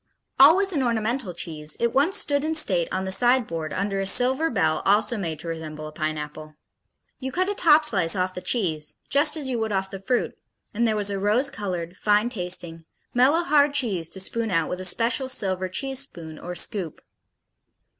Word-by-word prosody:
Always 365 +8 +6
an 290 - 0
ornamental 235 -2 -1
cheese, 155 -3 -4
it 235 -1 0
once 295 +8 +2
stood 285 -1 +2
in 320 +1 -1
state 185 - +3
on 185 0 -2
the 190 - -3
side 245 +5 +4
board 165 -4 -5
under 195 0 -2
a 195 - +1
silver 260 +9 +3
bell 160 -8 0
also 210 +4 +2
made 170 -7 -4
to 170 - -9
represent 160 -2 -6
a 155 0 -7
pineapple. 155 0 -5 0.6
You 265 0 -5
cut 370 +5 0
a - - 0
top 315 -6 +4
slice 175 -5 +3
off 185 0 -1
the 180 - -7
cheese, 160 -11 -2 0.2
just 295 +2 +3
as 290 -3 -3
you 250 -3 -2
would 220 -1 -2
off 190 -1 -2
the 195 - -7
fruit, 240 +6 -1 0.4
and 230 +2 +1
there 220 - 0
was 205 -1 0
a 200 - -3
rose 225 +8 +1
colored, 185 -6 -5
fine 210 +2 +2
tasting, 175 -6 -4 0.3
mellow 275 +8 +3
hard 290 -3 +3
cheese 195 - 0
to 190 - -6
spoon 225 +4 -2
out 165 -4 0
with 180 - -4
a - - -2
special 235 +7 +1
silver 190 -6 -1
cheese 270 +7 -2
spoon 165 - -7
or 180 +1 -7
scoop. 175 -2 -2
205 Hz, 200 wpm, -24 LUFS, 175-260 Hz, 0.6 s, Always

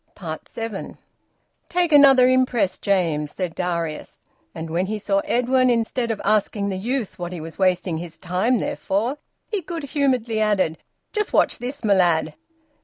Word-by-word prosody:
SEVEN. 225 -4 -6 0.7
"Take 350 -1 +1
another 270 -3 +7
impress, 255 -6 +2
James," 165 -7 0
said 180 -3 -3
Darius. 170 -3 -3 0.4
And 160 0 -6
when 180 +3 0
he 215 +2 -2
saw 200 -1 0
Edwin, 255 +1 +2
instead 235 0 0
of 220 -2 -2
asking 205 -1 +1
the 190 - -2
youth 235 +1 -3
what 175 0 -4
he 175 - -5
was 160 +3 -9
wasting 180 -3 +1
his 165 -1 -8
time 185 +8 0
there - - -2
for, 230 +9 -1 0.3
he 415 -3 -1
good 335 -1 -6
humouredly 255 -6 0
added: 190 -7 +1 0.3
"Just 425 -1 -1
watch - - +3
this, 255 +3 -6
my 210 -2 +4
lad." 170 -4 +2
210 Hz, 160 wpm, -22 LUFS, 180-255 Hz, 0.7 s, another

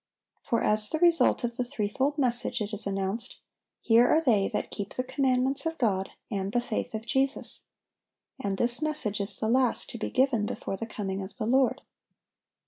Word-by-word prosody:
For 230 - 0
as 210 0 +2
the 315 - -1
result 335 -4 +4
of 235 -1 -2
the 250 - +1
threefold 245 +5 -1
message 250 -2 0
it 210 0 -3
is 210 0 -4
announced, 195 +3 -1 0.4
"Here 235 +1 +5
are 315 - +5
they 225 -11 +3
that - - -2
keep 200 -1 -5
the 255 - -1
commandments 265 +2 +1
of 325 0 -3
God, 195 -6 0 0.2
and 195 -1 -2
the 245 - +3
faith 235 -2 -3
of 220 +1 -5
Jesus." 270 +2 -1 0.7
And 200 -6 -2
this 240 +5 0
message 300 -10 -1
is 200 - -4
the 220 - -1
last 250 +1 +2
to 235 - -7
be - - -2
given 255 -5 +2
before 195 - -4
the 225 +4 -5
coming 195 -3 -4
of 190 +1 -8
the 225 - -2
Lord. 260 +2 +2
235 Hz, 190 wpm, -28 LUFS, 210-260 Hz, 0.7 s, Here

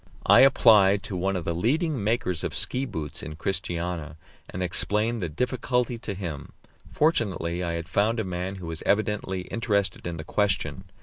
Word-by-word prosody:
I - - +7
applied 105 -7 +6
to 105 -3 -4
one 95 +2 0
of 90 -3 -3
the 85 - 0
leading 135 - 0
makers 100 -6 0
of - - -3
ski 130 +2 +1
boots 75 - -4
in 80 - -7
Christiania, 85 -3 -3 0.3
and 90 - -4
explained 105 +5 0
the 85 - -2
difficulty 125 - -1
to 105 -4 -5
him; 85 -7 -6 0.4
fortunately 100 - 0
I 85 -1 -2
had 85 0 -4
found 110 +4 +1
a - - 0
man 90 0 -4
who 95 -2 -8
was 80 -1 -6
evidently 105 -3 0
interested 100 -3 -1
in 85 -1 -4
the 80 - -6
question. 100 -1 -1
95 Hz, 175 wpm, -26 LUFS, 85-115 Hz, 0.4 s, I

